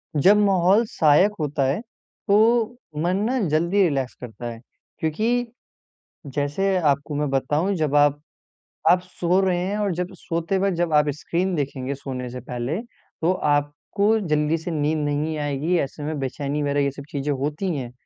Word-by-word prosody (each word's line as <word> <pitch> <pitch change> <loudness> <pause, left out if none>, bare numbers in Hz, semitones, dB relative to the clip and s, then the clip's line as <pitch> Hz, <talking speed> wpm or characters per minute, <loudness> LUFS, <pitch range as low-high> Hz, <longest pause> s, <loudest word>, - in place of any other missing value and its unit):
जब 190 +8 +5
माहौल 195 +1 +4
सहायक 160 +6 +4
होता 150 -2 -1
है 135 +7 0 0.5
तो 200 0 +5 0.7
मन 180 +2 +1
ना 260 0 0
जल्दी 170 +6 +2
रिलैक्स 135 -6 0
करता 120 0 -8
है। 115 - -9 0.4
क्योंकि 160 +8 -1 1.1
जैसे 185 +7 +1
आपको 140 +2 -2
मैं 145 0 0
बताऊँ 145 +8 +1
जब 150 -2 0
आप 145 0 +4 0.7
आप 180 +1 +6
सो 180 0 0
रहे 185 -2 +1
हैं 190 +4 -1
और 205 -2 0
जब 180 +1 -3
सोते 170 +3 -1
वक़्त 195 -1 +1
जब 170 -2 0
आप 150 0 +4
स्क्रीन 185 +2 -1
देखेंगे 140 -2 -3
सोने 130 -2 -5
से 125 +1 -6
पहले 125 +6 -2 0.4
तो 170 - +3 0.2
आपको 145 +9 0
जल्दी 150 +1 +2
से 165 +2 -5
नींद 155 0 0
नहीं 150 +2 -1
आएगी। 145 +4 0
ऐसे 145 +1 -4
में 155 +1 -3
बेचैनी 140 +2 -2
वग़ैरह 145 0 0
ये 140 - +1
सब 140 +1 -9
चीज़ें 140 0 -2
होती 150 +6 -2
हैं। 125 -4 -5
150 Hz, 165 wpm, -23 LUFS, 140-180 Hz, 1.1 s, आप